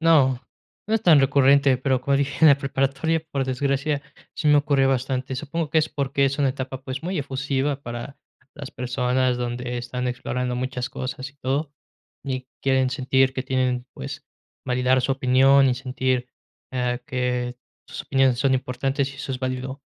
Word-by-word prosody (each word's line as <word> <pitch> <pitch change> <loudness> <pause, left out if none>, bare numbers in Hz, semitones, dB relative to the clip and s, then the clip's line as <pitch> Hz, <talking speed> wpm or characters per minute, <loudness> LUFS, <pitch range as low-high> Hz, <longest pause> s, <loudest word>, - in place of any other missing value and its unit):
No, 140 -6 +4 0.5
no 220 - +2
es 225 - +1
tan 160 -8 +6
recurrente, 140 0 +4
pero 130 -1 +1
como 140 +1 +1
dije, 140 0 -1
en 160 - +9
la 140 -1 +6
preparatoria, 135 +4 0
por 135 -1 0
desgracia, 140 +2 -1 0.3
sí 150 - 0
me 150 - +6
ocurrió 140 -2 +3
bastante. 130 0 -1
Supongo 155 +3 -3
que 160 - +3
es 155 0 +1
porque 140 -1 0
es 135 +1 0
una 140 -2 +3
etapa, 130 0 -6
pues, 130 +1 -5
muy 180 +1 -2
efusiva 135 0 -2
para 120 +3 -7 0.4
las 145 -3 -8
personas 125 0 0
donde 125 0 -3
están 125 +1 -4
explorando 125 0 -2
muchas 125 0 -3
cosas 130 +2 -5
y 140 - -32
todo, 140 +2 -2 0.5
y 130 -2 -4
quieren 130 -1 +2
sentir 130 0 +2
que 130 - -2
tienen, 130 -1 -1
pues, 65 - -7 0.4
validar 125 +1 +2
su 135 - +1
opinión 135 +1 +5
y 125 - +2
sentir, 130 0 -1 0.4
ah, 125 -1 -1
que 125 -2 -2 0.3
sus - - -6
opiniones 135 -2 +2
son 135 0 +3
importantes 135 +2 -1
y - - -13
eso 135 -1 -5
es 130 - -4
válido. 130 +1 -4
130 Hz, 175 wpm, -24 LUFS, 125-140 Hz, 0.5 s, en